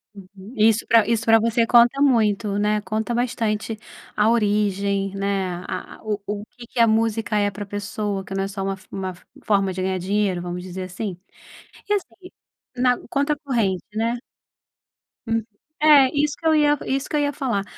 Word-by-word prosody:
Uhum. 195 Hz, +2 st, -13 dB
Isso 220 Hz, +1 st, +4 dB
para 230 Hz, -2 st, +5 dB
isso 230 Hz, -1 st, +1 dB
para 225 Hz, 0 st, +6 dB
você 230 Hz, +1 st, +1 dB
conta 240 Hz, +4 st, +5 dB
muito, 215 Hz, -6 st, +2 dB
né, 210 Hz, 0 st, +1 dB
conta 215 Hz, +4 st, -2 dB
bastante 225 Hz, -3 st, -1 dB, 0.4 s
a 210 Hz, +1 st, +3 dB
origem 200 Hz, -3 st, +1 dB
né, 195 Hz, -1 st, -1 dB, 0.2 s
a -, -, -6 dB
a -, -, -21 dB
o 210 Hz, -2 st, -2 dB
o 205 Hz, +1 st, -4 dB
que 245 Hz, -1 st, -13 dB
que 240 Hz, -, -6 dB
a 230 Hz, -, +6 dB
música 225 Hz, -1 st, +1 dB
é 205 Hz, 0 st, +2 dB
para 205 Hz, +2 st, -6 dB
pessoa 205 Hz, -1 st, -4 dB
que 190 Hz, -, -8 dB
não 195 Hz, 0 st, -1 dB
é -, -, -3 dB
só 195 Hz, 0 st, -5 dB
uma 195 Hz, 0 st, -1 dB
fo 190 Hz, -, -20 dB
uma 190 Hz, -1 st, -4 dB, 0.3 s
forma 195 Hz, -2 st, +2 dB
de 185 Hz, 0 st, -4 dB
ganhar 185 Hz, 0 st, -1 dB
dinheiro 190 Hz, -1 st, 0 dB
vamos 180 Hz, 0 st, -5 dB
dizer 185 Hz, 0 st, -6 dB
assim. 185 Hz, +1 st, -5 dB, 0.7 s
E -, -, +3 dB
assim 380 Hz, -2 st, -4 dB, 0.5 s
na 250 Hz, 0 st, +2 dB
conta 285 Hz, +3 st, +1 dB
corrente, 230 Hz, -, -1 dB
né. 230 Hz, +2 st, 0 dB, 1.1 s
Hum. 225 Hz, 0 st, 0 dB, 0.4 s
É, 295 Hz, -4 st, +7 dB
isso 295 Hz, 0 st, +1 dB
que -, -, -14 dB
eu 320 Hz, -, +5 dB
ia 295 Hz, -1 st, +4 dB
isso 270 Hz, +1 st, -2 dB
que -, -, -2 dB
eu -, -, +3 dB
ia 285 Hz, 0 st, +1 dB
falar, 240 Hz, -9 st, -1 dB
215 Hz, 190 wpm, -22 LUFS, 195-235 Hz, 1.1 s, É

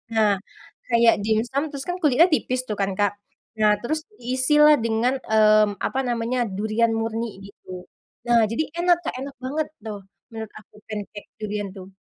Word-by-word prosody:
Nah, 215 Hz, -2 st, +4 dB, 0.6 s
kayak 235 Hz, -1 st, +5 dB
dimsum, 235 Hz, +6 st, 0 dB
terus 280 Hz, -2 st, -6 dB
kan 355 Hz, -, -1 dB
kulitnya 305 Hz, +3 st, +5 dB
tipis 255 Hz, -3 st, 0 dB
tuh 210 Hz, -, -2 dB
kan, 195 Hz, 0 st, 0 dB
Kak. 205 Hz, -1 st, +2 dB, 0.5 s
Nah 210 Hz, -1 st, +5 dB
terus, 310 Hz, +6 st, -1 dB, 0.2 s
diisilah 295 Hz, +5 st, +4 dB
dengan, 230 Hz, +3 st, +1 dB
mmm 215 Hz, -1 st, +4 dB
apa 265 Hz, -, -2 dB
namanya, 240 Hz, +1 st, -1 dB, 0.2 s
durian 220 Hz, +3 st, +1 dB
murni, 225 Hz, +1 st, -2 dB, 0.2 s
gitu. 185 Hz, -2 st, -11 dB, 0.4 s
Nah 235 Hz, -1 st, +5 dB
jadi 315 Hz, +7 st, 0 dB, 0.2 s
enak 350 Hz, -1 st, +4 dB
Kak, -, -, -2 dB
enak 275 Hz, +1 st, -7 dB
banget 300 Hz, +4 st, -2 dB, 0.2 s
tuh, 210 Hz, -2 st, -5 dB, 0.3 s
menurut 220 Hz, -1 st, -7 dB
aku, -, -, -23 dB
pancake 210 Hz, -1 st, -7 dB
durian 210 Hz, -1 st, -3 dB
tuh. 190 Hz, 0 st, -11 dB
230 Hz, 160 wpm, -23 LUFS, 215-260 Hz, 0.6 s, kayak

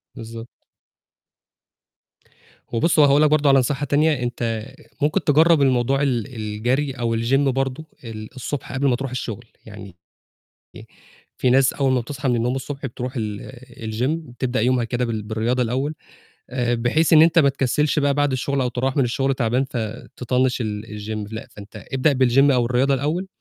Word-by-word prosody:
بالضبط. 115 Hz, +1 st, -10 dB, 2.0 s
وبُص 155 Hz, +7 st, +1 dB
وهاقول 145 Hz, 0 st, +5 dB
لك 155 Hz, -, +5 dB
برضه 150 Hz, -1 st, +3 dB
على 135 Hz, -1 st, +6 dB
نصيحة 140 Hz, +3 st, -1 dB
تانية، 145 Hz, -1 st, +2 dB
أنت 115 Hz, -2 st, -3 dB, 0.4 s
ممكن 150 Hz, +1 st, +1 dB
تجرّب 160 Hz, +1 st, +4 dB
الموضوع 135 Hz, 0 st, +2 dB
ال 125 Hz, -3 st, -1 dB
الجري 120 Hz, +7 st, -1 dB
أو 120 Hz, -3 st, -2 dB
الGym 120 Hz, +4 st, +2 dB
برضه، 135 Hz, +3 st, -2 dB, 0.2 s
ال 110 Hz, -1 st, -8 dB
الصبح 135 Hz, +2 st, -5 dB
قبل 140 Hz, +1 st, 0 dB
ما 125 Hz, -, +3 dB
ترُوح 135 Hz, +1 st, -5 dB
الشغل، 120 Hz, -2 st, -5 dB, 0.2 s
يعني 100 Hz, -4 st, -11 dB, 0.8 s
ي -, -, -10 dB, 0.5 s
في 125 Hz, -, +1 dB
ناس 130 Hz, +1 st, +4 dB
أول 135 Hz, -2 st, +1 dB
ما 125 Hz, -, +2 dB
بتصحى 135 Hz, +3 st, -4 dB
من 120 Hz, -, +2 dB
النوم 120 Hz, +2 st, 0 dB
الصبح 135 Hz, +1 st, -5 dB
بترُوح 125 Hz, 0 st, -5 dB
ال 105 Hz, +2 st, -5 dB, 0.4 s
الGym 125 Hz, +6 st, 0 dB, 0.2 s
بتبدأ 125 Hz, -1 st, -2 dB
يومها 125 Hz, 0 st, +2 dB
كده 120 Hz, +1 st, -2 dB
بال 110 Hz, -3 st, -3 dB
بالرياضة 110 Hz, +4 st, -1 dB
الأول، 130 Hz, +6 st, -1 dB, 0.6 s
بحيث 120 Hz, +5 st, +1 dB
إن 155 Hz, -1 st, +8 dB
أنت 165 Hz, +1 st, +4 dB
ما 140 Hz, -, +5 dB
تكسلش 140 Hz, +3 st, 0 dB
بقى 140 Hz, -1 st, +2 dB
بعد 145 Hz, -1 st, +1 dB
الشغل 135 Hz, +2 st, -1 dB
أو 125 Hz, -, +1 dB
تروَّح 130 Hz, +2 st, -2 dB
من 140 Hz, -, +3 dB
الشغل 135 Hz, +3 st, 0 dB
تعبان 125 Hz, +1 st, 0 dB
فتطنش 125 Hz, +2 st, -2 dB
ال 105 Hz, -2 st, -3 dB
الGym 105 Hz, 0 st, -6 dB
لأ، 110 Hz, -, -6 dB
فأنت 105 Hz, 0 st, -12 dB
ابدأ 135 Hz, +3 st, +2 dB
بالGym 135 Hz, +4 st, +4 dB
أو 120 Hz, -2 st, +2 dB
الرياضة 130 Hz, +3 st, +2 dB
الأول، 155 Hz, +8 st, -2 dB
130 Hz, 165 wpm, -22 LUFS, 115-140 Hz, 2.0 s, إن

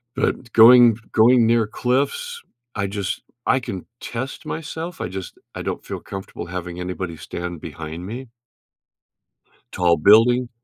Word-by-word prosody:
But 130 Hz, -2 st, -1 dB
going 115 Hz, 0 st, +8 dB
going 120 Hz, +2 st, +5 dB
near 115 Hz, -1 st, +3 dB
cliffs, 145 Hz, -, -1 dB, 0.3 s
I 100 Hz, -1 st, -2 dB
just 100 Hz, -1 st, -3 dB, 0.2 s
I 130 Hz, -, +3 dB
can 95 Hz, -7 st, -6 dB
test 130 Hz, +3 st, -6 dB
myself. 165 Hz, +2 st, -5 dB
I 90 Hz, -, -3 dB
just 95 Hz, -1 st, -7 dB, 0.2 s
I -, -, -6 dB
don't -, -, -4 dB
feel -, -, -5 dB
comfortable 95 Hz, -2 st, -8 dB
having 90 Hz, 0 st, -6 dB
anybody 90 Hz, -2 st, -5 dB
stand 85 Hz, +1 st, -6 dB
behind 80 Hz, +3 st, -7 dB
me. 120 Hz, +5 st, -7 dB, 1.4 s
Tall 85 Hz, -2 st, +2 dB
building. 120 Hz, +7 st, +5 dB
110 Hz, 135 wpm, -22 LUFS, 90-125 Hz, 1.4 s, going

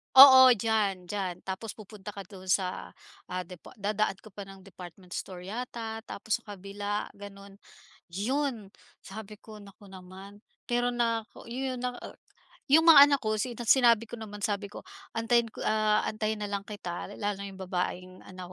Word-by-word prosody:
Oo, 260 Hz, -1 st, +11 dB
diyan, 200 Hz, -4 st, -1 dB
diyan. 185 Hz, -4 st, -3 dB
Tapos 195 Hz, +3 st, -5 dB
pupunta 210 Hz, -1 st, -10 dB
ka 200 Hz, -, -7 dB
doon, 190 Hz, -2 st, -12 dB
sa, 185 Hz, 0 st, -1 dB, 0.3 s
ah, 180 Hz, 0 st, -4 dB
depo 180 Hz, -1 st, -12 dB
dadaan 210 Hz, -1 st, -1 dB
ka 215 Hz, -, -14 dB
pa 200 Hz, +1 st, -9 dB
ng 195 Hz, 0 st, -13 dB
department 180 Hz, -1 st, -13 dB
store 180 Hz, 0 st, -6 dB
yata, 225 Hz, -1 st, -5 dB
tapos 220 Hz, +3 st, -2 dB
sa 215 Hz, -3 st, -10 dB
kabila, 205 Hz, +2 st, -4 dB
ganun. 200 Hz, -1 st, -12 dB, 0.6 s
Yun, 235 Hz, +1 st, -2 dB, 0.3 s
sabi 210 Hz, +1 st, -10 dB
ko, 215 Hz, -1 st, -12 dB
naku 200 Hz, -1 st, -15 dB
naman. 190 Hz, +2 st, -12 dB, 0.3 s
Pero 245 Hz, 0 st, +1 dB
nako 230 Hz, -1 st, -2 dB
yun 255 Hz, 0 st, -3 dB
naa 250 Hz, -1 st, -3 dB, 0.7 s
yung 305 Hz, +4 st, +6 dB
mga 320 Hz, -4 st, +10 dB
anak 280 Hz, -2 st, +1 dB
ko, 215 Hz, 0 st, 0 dB
sina 240 Hz, +1 st, -3 dB
sinabi 230 Hz, -2 st, +4 dB
ko 240 Hz, -, -7 dB
naman, 205 Hz, -2 st, -9 dB
sabi 205 Hz, -2 st, -1 dB
ko 205 Hz, -, -10 dB, 0.3 s
antayin 230 Hz, +1 st, +2 dB
ko, -, -, -7 dB
ah, 215 Hz, 0 st, +2 dB
antayin 215 Hz, 0 st, -3 dB
na 205 Hz, -, -4 dB
lang 200 Hz, 0 st, -3 dB
kita. 180 Hz, -5 st, -6 dB
Lalo 205 Hz, -1 st, -3 dB
na 200 Hz, -, -6 dB
yung 190 Hz, -1 st, -9 dB
babaeng 185 Hz, 0 st, -3 dB
anak 185 Hz, -1 st, -10 dB
210 Hz, 170 wpm, -29 LUFS, 195-230 Hz, 0.7 s, Oo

